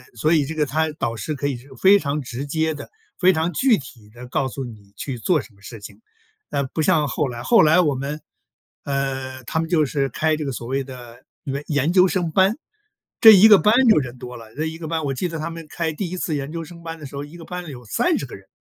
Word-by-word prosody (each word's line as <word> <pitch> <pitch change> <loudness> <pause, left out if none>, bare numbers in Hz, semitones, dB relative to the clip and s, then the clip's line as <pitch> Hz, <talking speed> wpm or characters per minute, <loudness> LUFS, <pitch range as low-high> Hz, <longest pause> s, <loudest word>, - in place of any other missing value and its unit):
所 155 +9 +2
以 150 -3 +3
这 160 - -5
个 150 -1 +1
他 155 +2 0
导 115 -5 -3
师 110 +9 -4
可 140 +1 -2
以 135 - -2
是 130 +4 -16
非 200 +1 +7
常 145 -1 -2
直 130 +2 -6
接 160 +2 0
地、 - - -9 0.3
非 185 0 +5
常 160 +2 -1
具 250 - +3
体 120 -7 -12
地 120 +3 -11
告 130 +1 -1
诉 135 +1 -5
你 105 -4 -13
去 135 -3 -5
做 165 +4 +2
什 115 - -16
么 100 - -24
事 115 +1 -10
情， 105 - -12 0.5
呃， 140 - 0
不 155 +4 -3
像 150 -1 +3
后 140 +3 -1
来。 120 -1 -6
后 230 - +5
来 160 +4 +5
我 150 -6 +2
们， 140 +3 -4 0.6
呃， 135 -2 -3
他 160 - -2
们 165 - -4
就 155 -4 +3
是 135 0 -1
开 155 +5 0
这 155 - -4
个 135 - -2
所 120 -1 -6
谓 135 +1 -1
的 120 -2 -12 0.2
研 140 +1 -3
研 150 +3 +1
究 185 0 +6
生 175 -3 -1
班。 190 - +3 0.6
这 220 - +11
1 215 +4 +8
个 205 - +9
班 210 +2 +4
就 215 - +6
人 125 -2 -6
多 125 0 -8
了， 115 -1 -14
这 155 +2 -2
1 160 0 -5
个 160 -2 -7
班 160 -1 -2
我 135 - -1
记 155 +8 -2
得 165 -1 -5
他 155 - -3
们 165 -1 -8
开 165 -2 -2
第 175 +2 -4
1 185 - -5
次 160 -3 -2
研 140 +1 -5
究 165 - -4
生 170 +1 -12
班 165 0 -6
的 150 - -9
时 140 - -10
候， 145 - -4
一 150 +4 -14
个 165 - -11
班 180 0 -6
里 - - -8
有 125 -2 -10
30 - - 0
个 - - -12
人。 - - -16
150 Hz, 275 characters per minute, -22 LUFS, 130-165 Hz, 0.6 s, 这